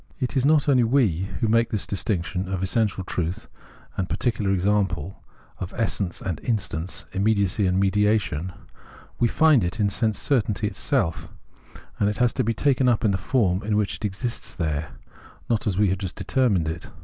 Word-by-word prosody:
It 130 -1 -3
is 135 0 +3
not 150 -1 +4
only 130 -4 +4
we 110 - +2
who 115 - +2
make 115 +1 +3
this 105 - -2
distinction 90 -1 -2
of 95 -1 -2
essential 100 -1 0
truth 90 -1 -3 0.5
and 95 -1 -2
particular 110 -5 -1
example, 95 -3 0 0.4
of 95 +1 -6
essence 100 -6 -2
and 90 -4 -3
instance, 95 -6 -2
immediacy 100 -1 +1
and 90 +1 +1
mediation; 100 -4 +1 0.7
we 120 - +4
find 150 -1 +4
it 90 +5 -3
in 100 -2 +3
sense 110 0 0
certainty 115 -9 0
itself, 80 - -1 0.7
and 100 - +3
it 105 - -3
has 120 -1 +2
to - - 0
be 115 - +1
taken 130 +1 +2
up 120 -1 +1
in 105 - +4
the 95 - +1
form 95 -3 +1
in 105 +1 0
which 105 -2 0
it - - -5
exists 105 +4 -3
there, 80 -2 -2 0.6
not 110 -2 0
as 95 -3 0
we 105 -1 +3
have 95 0 -1
just 95 -3 -4
determined 100 -3 +1
it. 80 +1 -5
100 Hz, 180 wpm, -24 LUFS, 90-115 Hz, 0.7 s, not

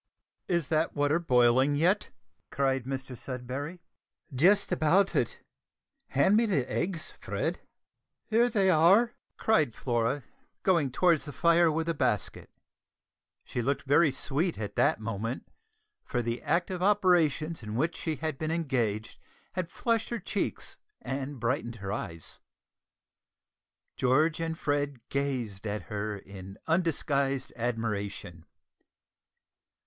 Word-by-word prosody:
"Is 170 -5 0
that 160 0 +1
water 145 +2 +2
boiling 130 -2 +4
yet?" 185 +8 +2 0.4
cried 135 -2 0
Mr 135 -1 -5
Sudberry. 130 +7 -6 0.5
"Just 180 +12 +4
about 180 +4 +3
it. 120 - -1 0.6
Hand 140 +10 +3
me 230 +1 +4
the 145 -11 +1
eggs, 175 0 -2
Fred." - - -2 0.7
"Here 235 +2 +3
they 200 -5 +2
are," 190 +9 +5 0.2
cried 155 - +2
Flora, 120 +2 0 0.4
going 170 -7 +3
towards 165 +3 +2
the 145 - -6
fire 170 +3 +4
with 160 +1 -1
a 165 - +1
basket. 130 - -1 0.9
She 120 - -3
looked 140 +4 -1
very 145 +2 +4
sweet 150 +6 -1
at 105 -2 -5
that - - +3
moment, 115 +2 -4 0.6
for 120 -1 -2
the 115 +1 -2
active 180 +1 0
operations 175 -6 +2
in 105 -1 -6
which 160 +7 0
she 160 -2 -3
had 155 -2 -4
been 155 - -2
engaged 125 -10 -1 0.3
had 185 -2 -3
flushed 230 +4 0
her 235 - -2
cheeks - - -3 0.2
and 135 0 -4
brightened 120 0 -1
her 100 -3 -5
eyes. 85 -6 -5 1.6
George 155 +6 +3
and 165 0 -2
Fred 145 -5 -2
gazed 125 -8 -2
at 105 +1 -3
her 105 0 -4
in 95 0 -10
undisguised 140 -5 0
admiration. 105 -8 -3
140 Hz, 125 wpm, -29 LUFS, 120-170 Hz, 1.6 s, are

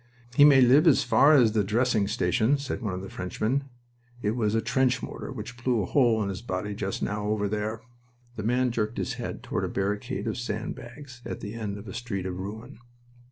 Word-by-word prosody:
"He 145 +3 +7
may 140 -3 +7
live 135 +7 +6
as 150 - +5
far 145 +3 +5
as 120 -6 +5
the 105 -1 +1
dressing 110 0 +1
station," 120 +4 +2
said 140 -2 -4
one 105 -5 -2
of 95 - -6
the - - -6
Frenchmen. 110 +9 -2 0.6
"It 105 - +1
was 110 -2 0
a - - +3
trench 130 +2 +1
mortar - - -6
which 125 -1 -8
blew 120 -5 +2
a - - -2
hole 115 -4 +3
in 100 - -2
his 95 0 -5
body 105 -2 -3
just 100 -1 -3
now, 105 0 -2
over 105 -1 0
there." 105 +2 -3 0.5
The 110 - -4
man 125 +3 +1
jerked 110 -1 -2
his - - -2
head - - -5
toward - - -2
a - - 0
barricade 105 +6 -2
of - - -2
sand 110 -2 -3
bags 130 +1 -11
at - - -5
the 105 0 -6
end 105 -3 -4
of 100 +2 -10
a 95 - -7
street 110 -6 -4
of 90 -1 -4
ruin. 110 +7 -7
110 Hz, 220 wpm, -27 LUFS, 105-125 Hz, 0.6 s, He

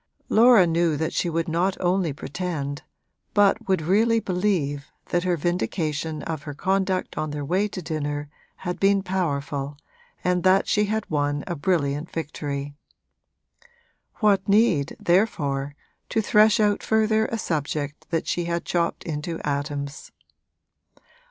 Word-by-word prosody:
Laura 230 -4 +7
knew 165 -2 +1
that 160 +2 -2
she 175 - 0
would 165 0 -1
not 175 +4 0
only 180 -2 +1
pretend, 145 -1 -4 0.5
but 205 -1 +3
would 190 -4 +1
really 225 +7 +3
believe, 180 -8 -1 0.2
that 175 0 0
her 180 -1 +1
vindication 160 -2 -2
of 160 -3 -4
her 145 0 -7
conduct 190 +2 0
on 155 - -2
their 145 -1 -4
way 185 +7 +1
to 185 -3 -7
dinner 145 -2 -3 0.4
had 180 0 -3
been 195 0 +3
powerful 145 -6 -2 0.5
and 180 0 +1
that 185 +2 +4
she 210 0 +2
had 220 +1 -2
won 145 -1 -1
a 175 - -3
brilliant 150 -2 0
victory. 145 -3 -4 1.4
What 200 -3 +2
need, 200 -9 +3
therefore, 145 -7 +1 0.3
to - - +1
thresh 215 +1 +4
out 210 -1 +2
further 220 0 +2
a 230 - -3
subject 150 -5 -3
that 165 -1 -1
she 175 - -1
had 170 0 -2
chopped 170 -1 -1
into 165 +1 -4
atoms? 140 0 -3
170 Hz, 140 wpm, -24 LUFS, 145-195 Hz, 1.4 s, Laura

